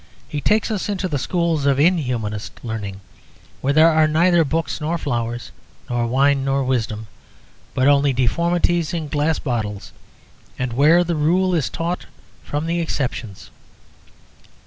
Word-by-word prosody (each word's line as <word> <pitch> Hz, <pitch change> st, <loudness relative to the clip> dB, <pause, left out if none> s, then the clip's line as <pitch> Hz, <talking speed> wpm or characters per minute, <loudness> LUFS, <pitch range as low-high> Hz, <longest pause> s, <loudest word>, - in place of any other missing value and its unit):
He 150 Hz, -, -4 dB
takes 215 Hz, +6 st, +2 dB
us 210 Hz, -1 st, -2 dB
into 195 Hz, -2 st, -1 dB
the 145 Hz, -5 st, -2 dB
schools 170 Hz, -3 st, 0 dB
of 140 Hz, -1 st, +3 dB
inhumanist 125 Hz, -, 0 dB
learning, 100 Hz, -4 st, -5 dB, 0.6 s
where 135 Hz, -, +1 dB
there 160 Hz, +2 st, +6 dB
are 155 Hz, -1 st, +4 dB
neither 170 Hz, +2 st, +4 dB
books 160 Hz, +1 st, -2 dB
nor 160 Hz, +3 st, -1 dB
flowers, 120 Hz, -5 st, -3 dB, 0.4 s
nor 120 Hz, -1 st, 0 dB
wine 135 Hz, +3 st, +2 dB
nor 135 Hz, 0 st, +1 dB
wisdom, 115 Hz, -4 st, -1 dB, 0.7 s
but 130 Hz, +1 st, +3 dB
only 145 Hz, 0 st, +4 dB
deformities 170 Hz, +6 st, +1 dB
in 155 Hz, -3 st, -4 dB
glass 150 Hz, +2 st, +1 dB
bottles, 110 Hz, -6 st, -3 dB, 0.7 s
and 125 Hz, -2 st, -2 dB
where 155 Hz, +7 st, +5 dB
the 170 Hz, -1 st, -2 dB
rule 180 Hz, +5 st, +2 dB
is 160 Hz, -7 st, +1 dB
taught 170 Hz, +2 st, -3 dB, 0.4 s
from 145 Hz, +2 st, -3 dB
the 170 Hz, +1 st, -1 dB
exceptions. 125 Hz, -, -4 dB
145 Hz, 145 wpm, -21 LUFS, 125-170 Hz, 0.7 s, there